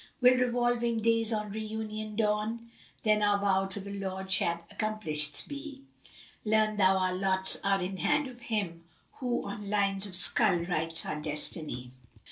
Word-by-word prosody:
Will 250 0 +5
revolving 240 -1 +1
days 230 0 +2
on 210 -1 -2
Re 220 +2 -4
union 215 0 -5
dawn? 220 +2 -1
* - - -22
Then 215 -1 +3
our 205 -1 +3
vow 195 -1 +1
to 195 +1 -1
the 200 +1 -7
Lord 190 0 -5
shall 170 -2 +1
accomplisht 155 -9 -1
be. 285 -1 -8 0.6
Learn 215 0 +2
thou 190 -1 +4
our 185 -1 +1
lots 190 0 +1
are 195 0 +2
in 190 +1 -4
hand 295 +7 +1
of 245 -2 -11
Him 195 -8 -3 0.2
* - - -39
Who 245 -2 -1
on 200 0 -6
lines 200 -1 +1
of 190 - -11
skull[FN#352] 180 -1 +4
writes 165 -1 0
our 150 - -4
destiny!" 150 -4 -1
205 Hz, 170 wpm, -30 LUFS, 190-220 Hz, 0.6 s, Will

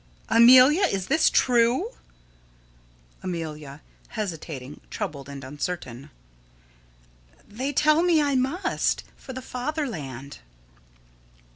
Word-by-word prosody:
Amelia, 255 - +7
is 195 - 0
this 315 0 +4
true? 250 - +2 1.3
Amelia: 155 -5 -6 0.3
[Hesitating, 160 - -6
troubled, 140 -2 -5
and 140 -1 -8
uncertain.] 140 -2 -6 1.4
They 255 +7 -4
tell 305 +3 +3
me 345 -2 +3
I 290 -1 +1
must 285 +9 0
for 260 - -10
the 260 0 -7
fatherland. 225 - -5
230 Hz, 90 wpm, -25 LUFS, -, 1.4 s, Amelia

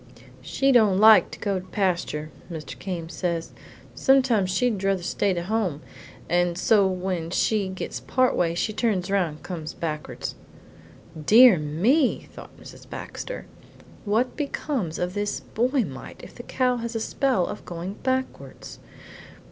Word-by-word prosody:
"She 275 0 +1
don't 215 -7 +5
like 220 +1 +7
to - - -9
go 200 -2 -1
to 185 - -11
pasture, 175 -6 -1 0.2
Mr. 160 -2 -7
Came 175 -4 -5
says. 170 -1 -3 0.4
Sometimes 255 -8 +3
she'd 225 +2 +1
druther 195 -2 0
stay 200 +3 0
to 170 - -2
home, 185 -7 -1 0.4
and 175 0 +1
so 200 +1 +4
when 185 -3 -2
she 205 +2 +1
gets 185 - -5
part 255 -1 +1
way 170 -1 +1
she 215 +5 -1
turns 205 -5 0
round 180 -6 +1
and 155 - -17
comes 160 -4 -6
backwards." 155 -2 -4 0.9
"Dear 225 +1 +7
me!" 205 - +1
thought - - -12
Mrs. - - -13
Baxter, - - -7 0.6
"what 225 +4 0
becomes 275 - -3
of 180 0 -2
this 205 0 -2
boy 250 +3 0
mite 130 -2 -10
if - - -11
the - - -9
cow 250 0 0
has 235 0 -5
a - - 0
spell 250 -3 +1
of - - -7
going 175 +2 -6
backwards? 260 0 -4
195 Hz, 150 wpm, -25 LUFS, 175-235 Hz, 0.9 s, like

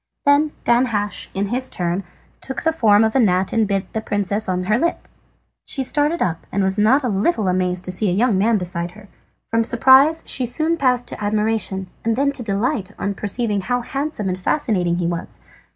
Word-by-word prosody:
Then 290 +2 +3
Danhasch, 230 -4 0
in 195 +1 -1
his 255 +3 -1
turn, 175 +2 -2 0.4
took 265 - -5
the 320 - +2
form 220 -8 +4
of 220 +2 0
a - - +4
gnat 190 -5 +2
and 225 -2 +2
bit 195 -1 -2
the 220 - -2
princess 205 -1 -1
on 180 0 -1
her 215 +5 +1
lip. 340 +4 -1 0.6
She 270 - -3
started 295 +5 +1
up, 165 -2 -3
and 200 0 0
was 190 +2 +1
not 255 +7 +4
a - - 0
little 215 - 0
amazed 180 0 0
at 180 - -2
seeing 185 -1 0
a - - -2
young 230 -1 +2
man 215 +4 +2
beside 175 -2 -3
her. 205 0 -15 0.4
From 230 0 +2
surprise 265 +7 +5
she 255 -2 0
soon 315 +7 0
passed 250 -5 +1
to - - -7
admiration, 210 -2 -1 0.2
and 225 0 +1
then 280 +3 +1
to 275 - -4
delight 205 -2 -1
on 200 - -2
perceiving 205 0 -1
how 245 +5 -1
handsome 270 -4 -4
and 185 0 -2
fascinating 185 - 0
he 175 - -1
was. 170 0 -4
215 Hz, 200 wpm, -20 LUFS, 190-255 Hz, 0.6 s, surprise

